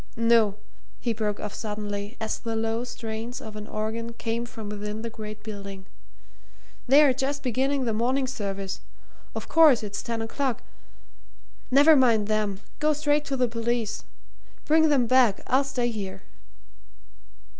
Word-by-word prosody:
No!" 230 -3 +4 0.4
he 235 - -1
broke 210 -2 -2
off 210 - -5
suddenly, 210 0 -4
as 220 -1 -2
the 230 -1 -3
low 225 +1 -1
strains 230 0 -5
of 220 -1 -9
an 210 0 -7
organ 225 +2 -3
came 230 +1 -3
from 220 -2 -8
within 210 +1 -5
the 230 - -4
great 215 -1 -8
building. 200 -3 -7 1.0
"They're 280 +1 +7
just 275 +2 -2
beginning 265 +2 +1
the 225 - 0
morning 255 +5 +1
service 200 -6 -4 0.6
of - - -5
course, 305 -8 +6
it's 205 -1 -4
ten 230 -1 -3
o'clock. 255 +2 -2 1.1
Never 285 +4 +7
mind 230 -6 +4
them 210 -2 0 0.2
go 305 +1 +3
straight 295 0 +1
to 275 - -2
the 250 -1 +2
police. 230 -1 -2 0.6
Bring 315 +1 +5
them 270 -5 +4
back 240 -4 +4
I'll 260 +2 +3
stay 250 -3 -1
here." 195 -3 -6
230 Hz, 145 wpm, -26 LUFS, 215-260 Hz, 1.1 s, They're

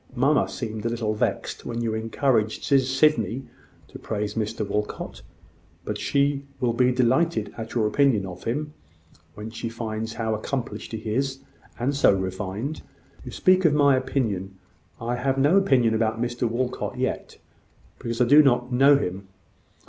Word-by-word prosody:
Mamma 140 +5 +2
seemed 110 -4 -5
a 115 - 0
little 115 -2 -1
vexed 105 - -2
when 120 0 -4
you 115 -2 -1
encouraged 110 0 0
Sydney 135 -3 +2 0.5
to - - -10
praise 105 -1 -3
Mr 110 -1 -2
Walcot: 105 +1 -4 0.6
but - - -3
she 140 0 +1 0.2
will 125 -3 +1
be 125 +1 +3
delighted 130 0 +1
at 115 +1 -7
your 115 -3 +2
opinion 115 -2 +2
of 90 -1 -9
him, 150 +6 -2 0.6
when 105 +2 -7
she 115 0 -5
finds 110 -1 -4
how 110 -1 -2
accomplished 120 +4 -4
he 110 -1 -4
is 135 +2 -1 0.4
and 135 +4 -1
so 135 -7 +5
refined!" 95 +9 -4 0.4
"You - - -8
speak 185 0 +3
of 155 -4 +4
my 140 -2 +5
opinion. 105 -8 -2 0.4
I 120 +1 -2
have 135 +2 0
no 145 +6 +4
opinion 130 - +4
about 110 0 0
Mr 120 0 -1
Walcot 125 +2 -3
yet, - - -3 0.6
because 115 0 -4
I 125 - +5
do 145 +5 +8
not 125 -3 +2
know 135 +3 +6
him. 95 -5 -4
120 Hz, 155 wpm, -25 LUFS, 110-135 Hz, 0.6 s, do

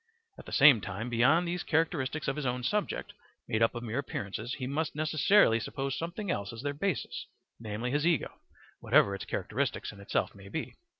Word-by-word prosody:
At - - -12
the - - -8
same 140 -6 +7
time 105 +6 -5
beyond 135 +9 +4
these 175 +1 -2
characteristics 155 -2 0
of 135 - 0
his 150 -2 -3
own 125 0 -2
subject, 210 +10 -1 0.3
made 110 - 0
up 115 +2 +3
of 120 - -5
mere 120 +3 -2
appearances, 110 -2 -4
he 130 - -4
must 145 +4 -2
necessarily 155 - +4
suppose 135 +3 -3
something 175 +4 -3
else 100 -1 -2
as 115 +2 -8
their 145 0 -1
basis, 170 +3 -2 0.3
namely, 115 +2 -3
his 145 +3 +1
ego, 165 -8 0 0.4
whatever 100 - +4
its 100 - -5
characteristics - - -2
in - - -14
itself 100 - -1
may 100 -1 -13
be. 160 - -4
135 Hz, 190 wpm, -30 LUFS, 115-155 Hz, 0.4 s, same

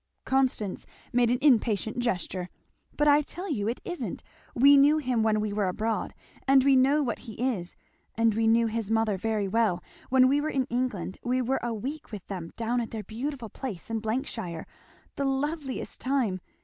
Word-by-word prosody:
Constance 260 -7 0 0.3
made 240 -1 +4
an 245 - +2
impatient 230 -4 +3
gesture. 185 -6 -2 0.5
"But 295 - +3
I 290 0 +6
tell 355 +6 -6
you 210 -7 -1
it 235 - -2
isn't! 355 -1 -5 0.3
We 280 +4 +7
knew 285 +2 +6
him 255 -6 0
when 220 -1 +2
we 210 -1 -2
were 205 -2 +1
abroad, 220 +4 -2 0.3
and 270 -1 +6
we 275 0 +5
know 275 +3 +4
what 235 -5 -2
he 225 - -9
is, 215 -7 -2 0.4
and 230 -1 +3
we 225 +1 +1
know 230 +1 +4
his 225 -2 -2
mother 225 -2 +2
very 210 +1 -1
well. 210 -4 +1 0.3
When 255 0 +6
we 285 +2 +3
were 310 - -1
in 265 -3 0
England 240 -8 -2
we 250 +1 +1
were 255 +2 0
a 240 - -2
week 275 +8 -6
with 205 -4 -7
them 180 -4 -6
down 235 +2 0
at 230 - -4
their 220 -2 -5
beautiful 245 +1 -5
place 225 -6 -6
in 225 -1 -1 0.2
shire, 175 - -6 0.5
the 280 - 0
loveliest 275 0 -2
time! 255 -8 0
235 Hz, 190 wpm, -28 LUFS, 215-270 Hz, 0.5 s, We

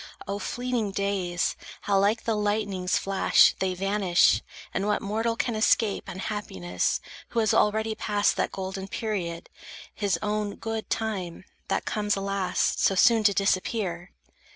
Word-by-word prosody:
O 200 +1 -3
fleeting 245 -2 -2
days! 190 -3 -1 0.3
How 200 -1 +2
like 210 +3 +2
the 225 - 0
lightning's 205 -3 0
flash, 195 -1 +4
They 185 -1 0
vanish! 195 -1 +3 0.3
And 195 +2 -1
what 210 - +2
mortal 225 +3 -1
can 235 - -1
escape 215 -1 +2
Unhappiness, 95 - -2 0.3
who 235 - -1
has 220 -2 +2
already 220 +1 +2
passed 205 -1 +1
That - - -1
golden 190 0 -5
period, 190 -6 -3 0.5
his 200 -3 0
own 210 -1 -1
good 225 -1 -5
time, 190 -6 -3 0.2
That - - -1
comes, 210 -1 0
alas, 195 -1 0
so 195 - +3
soon 225 +3 +5
to 200 - +5
disappear? 190 -2 0
200 Hz, 140 wpm, -26 LUFS, 190-215 Hz, 0.5 s, soon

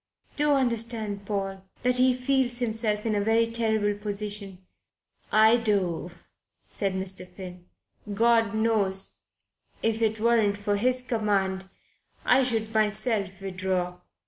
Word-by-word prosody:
Do 295 0 +3
understand, 230 -6 -1
Paul, 195 -2 -3 0.2
that 250 0 +3
he 255 0 +4
feels 255 -1 +1
himself 220 -3 -1
in 220 - +1
a 205 - +1
very 225 +2 +3
terrible 220 -2 0
position." 205 -2 -5 0.7
"I 220 +2 +6
do," 195 -7 0 0.5
said 195 -2 -1
Mr. 190 -1 -4
Finn. 180 -1 -11 0.4
"God 225 0 +3
knows 210 -4 +1 0.6
that - - +3
if 225 0 -3
it 220 -1 +1
weren't 220 -3 +3
for 205 0 -1
His 250 +4 +1
command, 195 -5 -1 0.6
I 255 +2 +5
should 225 -3 -1
myself 215 -3 0
withdraw." 185 -2 -2
215 Hz, 125 wpm, -26 LUFS, 195-230 Hz, 0.7 s, I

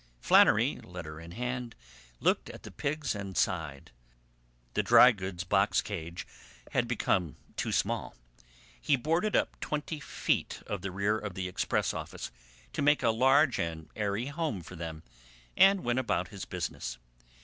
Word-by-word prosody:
Flannery, - - +5
letter 85 -3 -8
in 85 +1 -10
hand, 125 +1 -4 0.4
looked - - +1
at - - -10
the - - -9
pigs 150 +2 -2
and 100 -3 -6
sighed. 80 -7 -1 0.8
The - - +2
dry 125 - +8
goods 95 -4 -5
box 95 +3 +3
cage 85 -4 -5 0.5
had 120 -2 +1
become 95 -8 0 0.2
too - - -2
small. - - -1 0.7
He 140 - +3
boarded 165 - 0
up - - +1
twenty 150 +1 -3
feet - - -1
of 100 -3 -4
the 95 - -3
rear 100 +3 0
of 105 -4 -6
the 95 -1 -2
express 90 - 0
office - - -6 0.4
to - - -2
make 145 -1 +4
a 115 - +4
large 135 +4 +4
and 80 -1 -4
airy 105 +2 -1
home 140 - -3
for 90 - -10
them, 80 -1 -6 0.5
and 195 0 +6
went 120 +1 +1
about 90 -8 -1
his 100 -2 -7
business. 80 -8 -4
100 Hz, 155 wpm, -30 LUFS, 90-130 Hz, 0.8 s, dry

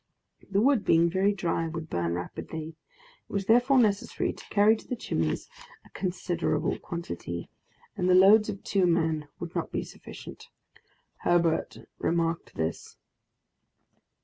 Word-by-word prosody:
The 200 +1 +2
wood, 260 -3 +3
being 170 -1 +4
very 195 +3 +3
dry, 170 -4 -1
would 165 -1 -5
burn 85 - -1
rapidly; 155 - -6
it 160 -1 -22
was 200 -1 -1
therefore 245 +5 +4
necessary 210 -5 +1
to - - -13
carry 210 +2 +4
to 220 - -12
the 250 - -2
Chimneys 240 - -2 0.4
a - - -19
considerable 180 -2 -1
quantity, 85 - -6 0.5
and 180 - 0
the 180 - +6
loads 210 +4 +7
of 200 -2 -5
two 195 -3 +2
men 160 -3 +1
would - - -6
not - - -3
be - - -2
sufficient. - - -11 0.7
Herbert 170 -2 +1
remarked 165 0 -1
this. 80 +1 -4
175 Hz, 140 wpm, -28 LUFS, 165-205 Hz, 0.7 s, loads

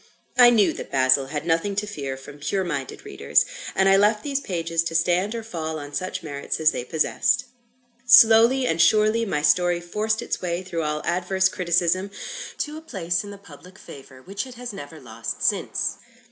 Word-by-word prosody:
I 245 -2 +8
knew 220 -5 +3
that - - -8
"Basil" 130 0 +3
had 150 +2 -5
nothing 170 +4 0
to 205 +1 -1
fear 140 -9 -5
from 140 +2 -12
pure 190 +6 -1
minded 145 -7 -5
readers; - - +1 0.3
and 190 - +3
I 195 0 +6
left 210 +2 +2
these 280 -2 -1
pages 165 -6 -2
to 165 - -4
stand 180 +6 +1
or 230 - -5
fall 160 -7 -5
on 145 -1 -9
such 185 +2 -4
merits 140 -3 -4
as 160 0 +4
they - - -4
possessed. 235 - 0 0.6
Slowly 230 +4 +7
and 165 -8 +1
surely, 215 +3 +3
my 150 -6 -2
story 175 +3 +3
forced 215 +6 -2
its - - -4
way 175 0 -3
through 170 -3 -4
all 150 -1 -3
adverse 190 +2 +1
criticism, 180 +1 0 0.5
to 300 +1 -4
a - - -9
place 175 - -3
in 205 - -9
the 200 - -9
public 180 0 -15
favour 130 -1 -13
which 200 - -5
it 255 - -12
has 245 -1 -7
never 155 -4 -9
lost 115 -3 -7
since. - - -1
180 Hz, 190 wpm, -23 LUFS, 155-210 Hz, 0.6 s, I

